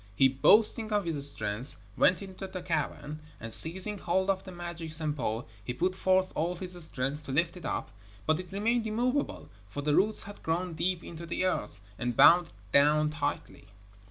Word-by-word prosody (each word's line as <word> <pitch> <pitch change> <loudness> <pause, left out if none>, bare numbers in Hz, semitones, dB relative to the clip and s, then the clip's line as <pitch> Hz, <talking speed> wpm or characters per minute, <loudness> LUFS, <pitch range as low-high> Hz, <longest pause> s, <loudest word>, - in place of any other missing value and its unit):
He, 135 - +6
boasting 215 - +5
of 205 -2 +1
his 145 -4 +4
strength, 120 -1 0 0.2
went 185 +1 +3
into 190 0 -8
the 185 -1 -7
cavern, 150 -2 -3 0.2
and 115 -1 -7
seizing 190 +5 0
hold 190 +3 +1
of 190 -1 -3
the 185 - -8
magic 170 -2 -7
Sampo, 145 -8 -2 0.2
he 120 +3 -4
put 180 +6 0
forth 185 0 +2
all 170 +3 -1
his 180 +1 -6
strength 145 0 -2
to 135 - -4
lift 170 +6 +1
it 180 - -10
up, - - -3 0.3
but 155 +1 +2
it 180 -1 -8
remained 225 +3 0
immovable, 250 +6 -1 0.2
for 145 +7 -5
the 150 0 +1
roots 210 +6 +2
had 205 0 -11
grown 170 +2 -2
deep 175 +2 -1
into 170 0 -9
the 175 +2 -1
earth, 105 - -2 0.2
and 120 -1 -2
bound 175 0 +7
it - - -21 0.2
down 150 +2 +4
tightly. 150 -8 -4
170 Hz, 185 wpm, -29 LUFS, 150-190 Hz, 0.3 s, bound